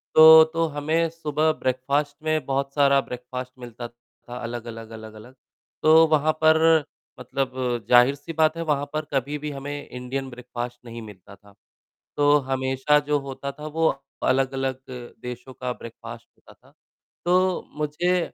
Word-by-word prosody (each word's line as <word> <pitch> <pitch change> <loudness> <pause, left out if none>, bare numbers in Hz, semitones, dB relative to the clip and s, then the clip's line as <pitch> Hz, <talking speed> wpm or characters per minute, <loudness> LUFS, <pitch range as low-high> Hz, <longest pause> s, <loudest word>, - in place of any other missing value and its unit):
तो 160 0 +10
तो 165 0 +1
हमें 155 +3 0
सुबह 155 -1 0
ब्रेकफास्ट 140 +3 -1
में 155 -3 0
बहुत 135 +1 -2
सारा 140 -1 +4
ब्रेकफास्ट 125 0 -7
मिलता 120 -1 -8
था 120 +1 -14
अलग-अलग, 115 -1 -6
अलग-अलग, 110 +2 -11 0.5
तो 160 +1 +7
वहाँ 155 0 +3
पर 160 0 +5 0.4
मतलब 130 +1 -3 0.4
ज़ाहिर-सी 135 +6 +4
बात 160 +1 +2
है 165 - -2
वहाँ 145 -3 0
पर 155 0 -2
कभी 140 +2 -1
भी 150 0 -5
हमें 145 +1 -6
इंडियन 130 +2 -5
ब्रेकफास्ट 120 0 -7
नहीं 115 0 -8
मिलता 100 -3 -13
था, 100 0 -21 0.6
तो 145 0 +5
हमेशा 130 +2 +2
जो 145 -1 +3
होता 140 0 -6
था 150 +2 -9
वो 160 +1 +1 0.4
अलग-अलग 135 0 0 0.4
देशों 125 +1 -8
का 125 0 -4
ब्रेकफास्ट 115 0 -10
होता - - -18
था। - - -25 0.5
तो 185 +1 +2 0.2
मुझे 150 +5 0
135 Hz, 145 wpm, -24 LUFS, 125-155 Hz, 0.6 s, तो